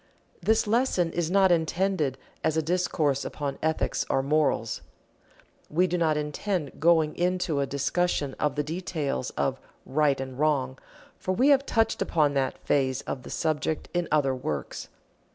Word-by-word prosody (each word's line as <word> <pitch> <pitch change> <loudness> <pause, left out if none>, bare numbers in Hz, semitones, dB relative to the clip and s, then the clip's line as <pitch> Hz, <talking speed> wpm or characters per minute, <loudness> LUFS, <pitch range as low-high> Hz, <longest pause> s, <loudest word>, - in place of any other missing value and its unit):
This 220 +5 +2
lesson 210 -6 +1
is 170 -2 -1
not 190 0 +4
intended 165 -4 +1 0.3
as 160 - +1
a 160 - +2
discourse 155 -5 0
upon 140 -2 -4
Ethics 160 0 0
or 135 - +1
morals. 140 -6 +1 0.9
We 175 +4 +3
do 180 -1 -1
not 160 -3 +2
intend 150 +1 -3
going 160 -1 +3
into 180 -4 0
a 140 - 0
discussion 145 +1 0
of 150 -2 0
the 150 - 0
details 155 - -3
of - - 0 0.3
"Right 145 -1 +2
and 130 0 -6
Wrong," 135 -4 +1 0.4
for 185 - -1
we 255 +9 +3
have 275 -1 +4
touched 225 -1 +1
upon 150 -3 +2
that 135 -1 0
phase 130 -2 0
of 130 - -5
the - - -10
subject 155 0 -1
in 175 -1 0
other 145 -3 +3
works. 75 - -4
155 Hz, 155 wpm, -27 LUFS, 140-180 Hz, 0.9 s, not